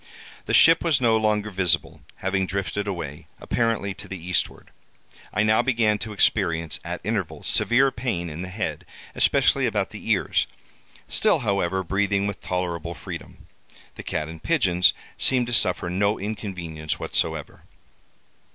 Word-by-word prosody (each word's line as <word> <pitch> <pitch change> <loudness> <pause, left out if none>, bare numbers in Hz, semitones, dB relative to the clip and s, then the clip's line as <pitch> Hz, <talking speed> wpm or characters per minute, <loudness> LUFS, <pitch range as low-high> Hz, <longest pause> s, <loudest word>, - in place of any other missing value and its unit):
The - - -1
ship 165 0 +7
was 160 -6 +3
no 115 -3 +3
longer 105 -1 +1
visible, 90 -3 0
having 95 0 -1
drifted 100 +1 -3
away, 80 -7 -5
apparently 115 -4 -1
to 100 - -10
the 95 - -6
eastward. 90 +1 -2 0.6
I 105 - +1
now 110 +2 +4
began 115 -4 +1
to 110 - -5
experience, 85 -6 +1
at - - -5
intervals, - - -3
severe 130 +3 +3
pain 115 -10 -3
in 80 +1 -6
the 95 - -5
head, 105 +3 -4 0.3
especially - - +3
about - - -1
the - - -8
ears—still, - - 0
however, 95 -3 0
breathing 100 +2 0
with 100 -1 -4
tolerable 90 -2 -3
freedom. - - -9 0.5
The - - -9
cat 75 -1 -3
and 80 0 -10
pigeons 95 - +3 0.3
seemed 125 -2 +3
to 120 - -4
suffer 90 -6 +3
no 100 +4 +1
inconvenience 90 -7 -4
whatsoever. - - -1
100 Hz, 140 wpm, -24 LUFS, 90-110 Hz, 0.6 s, ship